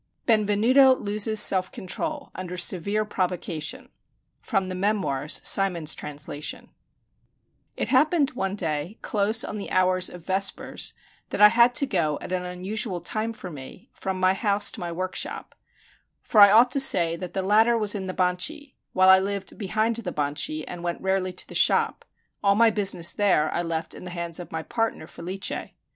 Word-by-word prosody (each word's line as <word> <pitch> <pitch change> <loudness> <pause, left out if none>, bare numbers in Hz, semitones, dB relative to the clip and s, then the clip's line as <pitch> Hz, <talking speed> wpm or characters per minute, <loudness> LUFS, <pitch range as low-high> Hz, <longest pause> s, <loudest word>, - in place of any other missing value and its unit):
BENVENUTO 225 +5 +4
LOSES 215 0 0
SELF 185 -3 +3
CONTROL 290 - -5
UNDER 180 -1 -7
SEVERE 200 +4 0
PROVOCATION 185 - -4 0.5
From 195 -5 -1
the 185 - -5
'Memoirs': 185 -7 0
Symonds's 175 -6 +2
Translation 150 0 -6 1.1
It - - -2
happened 290 +2 +3
one 195 -5 -3
day, 165 +1 -3
close 215 +2 0
on 210 - -5
the 200 - -6
hours 185 0 +2
of 175 -2 -12
vespers, 190 +1 -1 0.3
that - - -4
I 210 0 +9
had 235 +2 +4
to 290 - +2
go, 160 - -1
at - - -9
an 180 -1 -1
unusual 185 +2 -3
time 215 +6 -3
for 195 -5 -9
me, 140 +4 -11
from 190 -1 -4
my 185 0 +3
house 205 0 0
to - - -10
my 175 -2 -4
workshop; 185 +2 -4 0.7
for 215 - +4
I 200 - +10
ought 235 +5 +5
to 275 - +1
say 170 -11 +4
that 180 0 -7
the 190 - -2
latter 220 +4 +4
was 210 -2 +3
in 195 -3 -4
the 185 - -5
Banchi, 190 - -1 0.2
while 185 0 +4
I 190 0 +8
lived 200 0 -4
behind 220 +3 0
the 210 -6 -5
Banchi, 150 +1 -2
and 175 -1 -7
went 175 -1 -3
rarely 190 -1 0
to 180 - -4
the - - -11
shop; - - +2 0.4
all 200 -1 +4
my 225 +1 +5
business 195 -5 +1
there 180 -7 +1
I 175 - 0
left 165 -1 -4
in - - -11
the - - -6
hands 170 -1 -3
of 175 - -9
my 160 0 -4
partner, 225 -7 -2
Felice. 185 +4 -5
190 Hz, 175 wpm, -25 LUFS, 180-215 Hz, 1.1 s, I